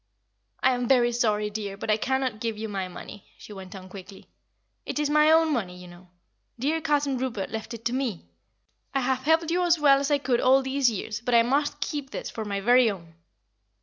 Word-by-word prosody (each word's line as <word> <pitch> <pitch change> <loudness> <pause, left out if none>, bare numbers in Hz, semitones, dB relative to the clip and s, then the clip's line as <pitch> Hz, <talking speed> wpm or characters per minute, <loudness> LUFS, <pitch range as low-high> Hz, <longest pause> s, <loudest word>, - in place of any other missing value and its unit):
"I 260 - +4
am 245 -1 -2
very 240 -2 +4
sorry, 210 -3 0
dear, 205 -2 -5
but 215 - -2
I 215 - +3
cannot 260 -1 -1
give 225 -1 -3
you 220 +1 -4
my 195 -3 -3
money," 190 +2 -11
she 210 - -12
went 190 0 -10
on 185 -1 -10
quickly. 190 0 -12 0.6
"It - - -5
is 295 -1 0
my 300 +1 +5
own 320 -1 +4
money, 185 -8 -3
you 180 0 -11
know. 175 +1 -15 0.5
Dear 300 +7 -1
Cousin 290 -4 0
Rupert 235 -7 -3
left 220 +1 -5
it 230 - -13
to 235 - 0
me. 250 - -3 0.7
I 270 - +2
have 260 0 0
helped 320 +1 +2
you 355 +1 +1
as 345 -1 +3
well 280 -3 +5
as 280 +1 -2
I 290 - +3
could 260 -4 0
all 265 +1 +4
these 265 -1 +2
years, 215 0 -5
but 245 0 +1
I 230 - +6
must 280 +5 0
keep 290 -3 -3
this - - -6
for 220 - -5
my 200 -1 -3
very 245 +2 +5
own." 170 -5 -8
240 Hz, 220 wpm, -26 LUFS, 210-275 Hz, 0.7 s, I